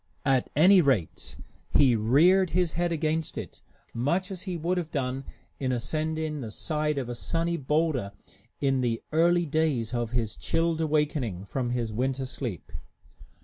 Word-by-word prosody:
At 135 Hz, -3 st, +2 dB
any 180 Hz, +5 st, +7 dB
rate, 130 Hz, -, -1 dB, 0.3 s
he 130 Hz, -4 st, +4 dB
reared 165 Hz, -, +4 dB
his 180 Hz, -3 st, +2 dB
head 175 Hz, +1 st, 0 dB
against 160 Hz, 0 st, -1 dB
it -, -, -7 dB, 0.3 s
much 170 Hz, -, 0 dB
as 185 Hz, -2 st, -5 dB
he 185 Hz, -3 st, -4 dB
would 175 Hz, +3 st, 0 dB
have 165 Hz, -3 st, -5 dB
done 135 Hz, -2 st, -3 dB, 0.3 s
in 130 Hz, -2 st, -1 dB
ascending 155 Hz, +4 st, -2 dB
the 115 Hz, -, -5 dB
side 150 Hz, +6 st, -2 dB
of 130 Hz, -3 st, -2 dB
a 120 Hz, -, -4 dB
sunny 165 Hz, +7 st, -1 dB
boulder 150 Hz, -7 st, 0 dB, 0.5 s
in 135 Hz, -2 st, +1 dB
the 115 Hz, -2 st, -1 dB
early 170 Hz, +2 st, +3 dB
days 145 Hz, -7 st, 0 dB
of 120 Hz, -2 st, -1 dB
his 115 Hz, -3 st, -1 dB
chilled 165 Hz, -1 st, 0 dB
awakening 150 Hz, -, 0 dB
from 125 Hz, +4 st, -2 dB
his 120 Hz, -3 st, -2 dB
winter 130 Hz, +3 st, -1 dB
sleep. 120 Hz, -, -6 dB
145 Hz, 155 wpm, -27 LUFS, 125-165 Hz, 0.5 s, any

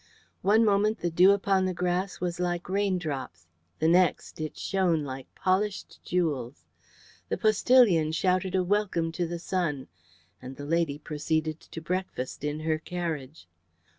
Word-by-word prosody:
One 215 Hz, +4 st, +4 dB
moment 210 Hz, +1 st, +2 dB
the 175 Hz, -, -1 dB
dew 180 Hz, +4 st, +6 dB
upon 195 Hz, -1 st, +2 dB
the 185 Hz, -1 st, -2 dB
grass 180 Hz, +2 st, -1 dB
was 175 Hz, -1 st, -3 dB
like 175 Hz, -1 st, -2 dB
raindrops, 175 Hz, -, -2 dB, 0.3 s
the 160 Hz, -, +1 dB
next 175 Hz, -2 st, +2 dB
it 155 Hz, -, -5 dB
shone 180 Hz, -5 st, +1 dB
like 135 Hz, -1 st, -6 dB
polished 195 Hz, +2 st, -1 dB
jewels. 145 Hz, -8 st, -2 dB, 0.6 s
The -, -, -1 dB
postillion 215 Hz, -7 st, +4 dB
shouted 185 Hz, +3 st, +1 dB
a 185 Hz, -, +2 dB
welcome 185 Hz, -4 st, 0 dB
to 170 Hz, +1 st, -2 dB
the 170 Hz, +1 st, -4 dB
sun, 170 Hz, -6 st, -2 dB, 0.5 s
and 130 Hz, +1 st, -8 dB
the 145 Hz, -, -8 dB
lady 165 Hz, -2 st, 0 dB
proceeded 155 Hz, +1 st, -2 dB
to 165 Hz, -, -10 dB
breakfast 175 Hz, -7 st, -4 dB
in 150 Hz, +1 st, -2 dB
her 155 Hz, 0 st, 0 dB
carriage. 160 Hz, -, -5 dB
175 Hz, 145 wpm, -28 LUFS, 155-190 Hz, 0.6 s, dew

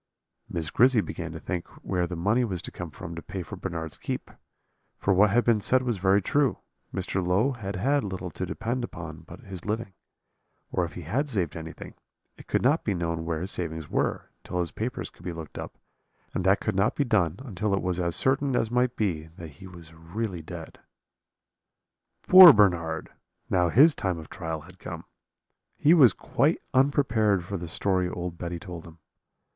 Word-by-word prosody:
"Miss 80 Hz, -2 st, -2 dB
Grizzy 125 Hz, 0 st, +5 dB
began 85 Hz, -5 st, -4 dB
to 80 Hz, -, -7 dB
think 90 Hz, -1 st, -4 dB, 0.2 s
where 90 Hz, -1 st, 0 dB
the 90 Hz, -, -5 dB
money 105 Hz, +9 st, +2 dB
was 95 Hz, -7 st, -3 dB
to -, -, -5 dB
come -, -, -7 dB
from 85 Hz, -, -8 dB
to 85 Hz, -, -6 dB
pay 95 Hz, +1 st, -6 dB
for -, -, -8 dB
Bernard's 80 Hz, -2 st, -5 dB
keep; -, -, -4 dB, 0.7 s
for 100 Hz, -, +1 dB
what 100 Hz, +3 st, +5 dB
had 120 Hz, +5 st, +3 dB
been 115 Hz, -3 st, +3 dB
said 130 Hz, +5 st, +2 dB
was 120 Hz, -6 st, -1 dB
very 95 Hz, +2 st, +3 dB
true, 140 Hz, +1 st, +2 dB, 0.3 s
Mr. 95 Hz, 0 st, -1 dB
Low 95 Hz, +10 st, +2 dB
had 100 Hz, -6 st, -5 dB
had 140 Hz, +9 st, +1 dB
little 95 Hz, -3 st, -5 dB
to 95 Hz, -, -4 dB
depend 120 Hz, +6 st, -3 dB
upon 80 Hz, -8 st, -7 dB
but 85 Hz, -, -13 dB
his 95 Hz, -6 st, -9 dB
living; 105 Hz, -1 st, -3 dB, 0.8 s
or -, -, +1 dB
if -, -, -9 dB
he -, -, -7 dB
had 140 Hz, +4 st, -1 dB
saved 95 Hz, -, -1 dB
anything, 80 Hz, 0 st, -8 dB, 0.4 s
it -, -, -15 dB
could -, -, 0 dB
not 145 Hz, +6 st, +3 dB
be 100 Hz, -, 0 dB
known 85 Hz, -1 st, -2 dB
where 80 Hz, -1 st, -2 dB
his 95 Hz, +3 st, -3 dB
savings 80 Hz, -3 st, -3 dB
were, -, -, -1 dB
till 90 Hz, -, -5 dB
his 85 Hz, -2 st, -1 dB
papers 120 Hz, +3 st, -4 dB
could -, -, -19 dB
be 90 Hz, -, -3 dB
looked 80 Hz, -3 st, -8 dB
up, -, -, -8 dB, 0.6 s
and 90 Hz, -, -1 dB
that 95 Hz, +1 st, +4 dB
could 105 Hz, -, -1 dB
not 95 Hz, +2 st, +2 dB
be 145 Hz, -, +2 dB
done 100 Hz, -, +1 dB
until 105 Hz, -3 st, -2 dB
it 95 Hz, -, -2 dB
was 90 Hz, -1 st, -1 dB
as 85 Hz, -1 st, 0 dB
certain 135 Hz, +5 st, +1 dB
as 115 Hz, -1 st, 0 dB
might 125 Hz, 0 st, +1 dB
be 85 Hz, -7 st, -1 dB
that 85 Hz, -2 st, -8 dB
he 75 Hz, +6 st, -13 dB
was 85 Hz, -3 st, -13 dB
really 90 Hz, +3 st, -5 dB
dead. 80 Hz, 0 st, -9 dB, 1.5 s
"Poor 185 Hz, -2 st, +12 dB
Bernard! 85 Hz, -7 st, +2 dB, 0.4 s
now 90 Hz, -2 st, +3 dB
his 145 Hz, -, +7 dB
time 95 Hz, -8 st, -2 dB
of 80 Hz, -2 st, -10 dB
trial 80 Hz, -1 st, -4 dB
had -, -, -15 dB
come: -, -, -7 dB, 0.7 s
he 155 Hz, -, +5 dB
was 135 Hz, -, +7 dB
quite -, -, +1 dB
unprepared 120 Hz, -, +3 dB
for 100 Hz, -, -5 dB
the 85 Hz, -2 st, -4 dB
story 90 Hz, +1 st, 0 dB
old 90 Hz, -1 st, -5 dB
Betty 85 Hz, 0 st, -4 dB
told 85 Hz, -2 st, -9 dB
him. 80 Hz, 0 st, -14 dB
95 Hz, 195 wpm, -27 LUFS, 85-115 Hz, 1.5 s, Poor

